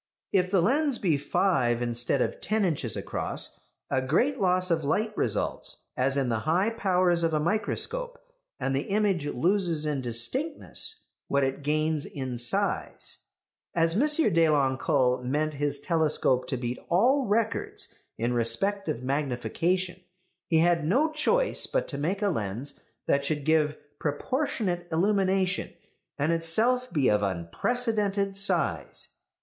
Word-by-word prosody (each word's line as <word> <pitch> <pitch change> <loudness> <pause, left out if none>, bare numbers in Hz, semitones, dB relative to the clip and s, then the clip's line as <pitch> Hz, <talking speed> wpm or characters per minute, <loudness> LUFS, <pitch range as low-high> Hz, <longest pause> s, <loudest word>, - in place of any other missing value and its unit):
If 185 -2 +3
the 185 -3 +3
lens 280 - +2
be 175 -8 +1
five 130 -6 +1
instead 120 +2 0
of - - -4
ten 215 -1 +1
inches 140 - 0
across, - - -2 0.3
a 130 - +2
great 235 - +1
loss 185 -1 +2
of 160 -1 +1
light 215 +9 0
results, 105 - -2
as 135 +2 +1
in 135 -2 +1
the 115 -2 0
high 175 - +1
powers 180 -5 +2
of 165 -1 +1
a - - +2
microscope, 220 - -1 0.4
and 135 0 -1
the 135 - -2
image 195 -7 +1
loses 170 +2 +1
in 145 -3 -1
distinctness 265 - -1 0.2
what 140 0 +1
it 135 +1 -1
gains 155 +1 0
in 130 -4 -5
size. 120 0 -2 0.6
As 165 -1 +3
M. 210 - +2 0.3
Deloncle 135 -5 +2
meant 150 +4 -1
his 145 0 -1
telescope 150 -5 +1
to 130 - -2
beat 120 0 -4
all 250 +9 +3
records 225 +2 0 0.2
in 120 +2 0
respect 195 - 0
of 125 -5 -3
magnification, 150 +7 -1 0.5
he 165 - +2
had 170 -1 +3
no 270 - +2
choice 475 +11 +1
but - - -1
to 140 - -5
make 190 +8 -1
a 205 - +3
lens 115 - -3 0.3
that 140 - +2
should 145 0 -2
give 155 -1 +2 0.2
proportionate 175 - -2
illumination, 190 +1 +1 0.5
and 145 +3 +1
itself 225 +10 +1
be 140 -6 +2
of 105 0 +3
unprecedented 200 - -1
size. 195 0 -1
165 Hz, 140 wpm, -27 LUFS, 135-200 Hz, 0.6 s, If